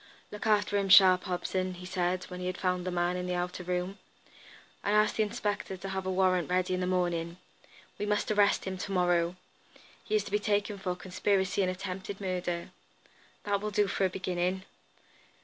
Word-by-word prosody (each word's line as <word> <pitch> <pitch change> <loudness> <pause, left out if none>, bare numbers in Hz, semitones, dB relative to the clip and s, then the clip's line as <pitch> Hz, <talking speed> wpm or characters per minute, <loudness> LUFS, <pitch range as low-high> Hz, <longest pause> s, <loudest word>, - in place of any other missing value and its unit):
"Look 210 +1 -5
after 205 -1 +3
him 195 -1 -1
sharp, 185 -2 +8
Hobson," 185 0 -2
he 180 +1 -10
said, 180 0 -1
when 180 - -8
he 180 - -3
had 185 0 -3
found 180 -1 -1
the - - +1
man 175 0 0
in 180 0 -3
the 180 - -1
outer 180 +1 -3
room. 180 +2 -2 0.8
"And 205 - +1
ask 210 0 +4
the - - +1
inspector 205 -3 -2
to 195 +2 -6
have 190 -1 -3
a - - 0
warrant 185 -2 +2
ready 185 0 +1
in 185 - 0
the 180 - -1
morning. 175 -2 -1 0.6
We 205 - -2
must 210 +1 0
arrest 205 -1 +3
him 190 -1 -4
to 200 - -4
morrow. 175 -2 +2 0.7
He - - -1
is 210 - +2
to 200 - -9
be 210 - +2
taken 205 -1 0
for 180 -2 -2
conspiracy 190 +1 0
and 185 - +2
attempted 190 +1 -5
murder. 180 -3 -3 0.7
That 200 -1 0
will 210 - -2
do 210 0 +2
for 195 0 0
a - - +2
beginning." 185 0 -2
185 Hz, 200 wpm, -30 LUFS, 180-200 Hz, 0.8 s, sharp